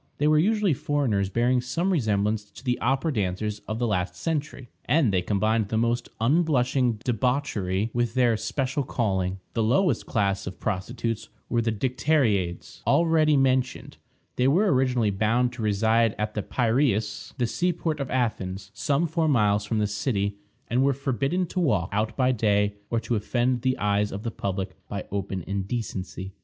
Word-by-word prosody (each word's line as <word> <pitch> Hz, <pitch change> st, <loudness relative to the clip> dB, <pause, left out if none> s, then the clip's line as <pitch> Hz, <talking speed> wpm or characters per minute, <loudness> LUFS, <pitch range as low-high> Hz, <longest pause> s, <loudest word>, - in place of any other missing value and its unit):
They 150 Hz, -, +2 dB
were 155 Hz, 0 st, +5 dB
usually 205 Hz, 0 st, +2 dB
foreigners, 125 Hz, -9 st, 0 dB
bearing 120 Hz, +4 st, +2 dB
some 165 Hz, +10 st, -1 dB
resemblance 105 Hz, -, 0 dB
to 115 Hz, -, -14 dB
the 125 Hz, -2 st, 0 dB
opera 135 Hz, +5 st, +1 dB
dancers 105 Hz, 0 st, -2 dB
of 110 Hz, -, -3 dB
the 120 Hz, -, 0 dB
last 90 Hz, -4 st, -1 dB
century, 150 Hz, -, -3 dB, 0.2 s
and 140 Hz, -9 st, +3 dB
they 90 Hz, -, +2 dB
combined 110 Hz, +3 st, +1 dB
the 110 Hz, -, 0 dB
most 120 Hz, +1 st, 0 dB
unblushing 130 Hz, -2 st, +2 dB
debauchery 115 Hz, -5 st, 0 dB
with 120 Hz, -1 st, 0 dB
their 120 Hz, -3 st, +4 dB
special 135 Hz, +5 st, -2 dB
calling. 95 Hz, -8 st, -1 dB
The 115 Hz, -, 0 dB
lowest 130 Hz, -, +2 dB
class 100 Hz, -3 st, 0 dB
of 95 Hz, -, -7 dB
prostitutes 115 Hz, +3 st, -3 dB, 0.2 s
were 120 Hz, -, +1 dB
the 115 Hz, 0 st, 0 dB
Dicteriades, 110 Hz, -, 0 dB
already 155 Hz, 0 st, +4 dB
mentioned. 130 Hz, -1 st, 0 dB, 0.4 s
They 125 Hz, -, +3 dB
were 185 Hz, +8 st, +3 dB
originally 125 Hz, -5 st, +2 dB
bound 115 Hz, +5 st, +1 dB
to 120 Hz, -, -7 dB
reside 110 Hz, +2 st, +2 dB
at 105 Hz, 0 st, -2 dB
the 105 Hz, -, -2 dB
Piræus, 115 Hz, -2 st, 0 dB
the 125 Hz, -, +1 dB
sea 175 Hz, +10 st, 0 dB
port 160 Hz, -2 st, -3 dB
of 135 Hz, -2 st, -3 dB
Athens, 100 Hz, -6 st, -2 dB
some 145 Hz, +6 st, +1 dB
four 160 Hz, 0 st, 0 dB
miles 105 Hz, -7 st, +2 dB
from 110 Hz, -, -1 dB
the 105 Hz, -, +2 dB
city, 100 Hz, -1 st, -1 dB, 0.3 s
and 125 Hz, +3 st, +1 dB
were 140 Hz, +1 st, +3 dB
forbidden 140 Hz, +6 st, -1 dB
to 185 Hz, -, -4 dB
walk 105 Hz, -, +1 dB
out 105 Hz, +2 st, -1 dB
by 130 Hz, -1 st, +3 dB
day, 105 Hz, -3 st, +2 dB, 0.2 s
or 115 Hz, -, +1 dB
to 115 Hz, +1 st, -3 dB
offend 120 Hz, +3 st, 0 dB
the 130 Hz, +1 st, +1 dB
eyes 105 Hz, 0 st, +1 dB
of 100 Hz, +2 st, -6 dB
the 115 Hz, -, -2 dB
public 95 Hz, -2 st, -3 dB
by 100 Hz, -2 st, -5 dB
open 95 Hz, -2 st, -3 dB
indecency. 100 Hz, -2 st, -4 dB
115 Hz, 170 wpm, -26 LUFS, 105-135 Hz, 0.4 s, were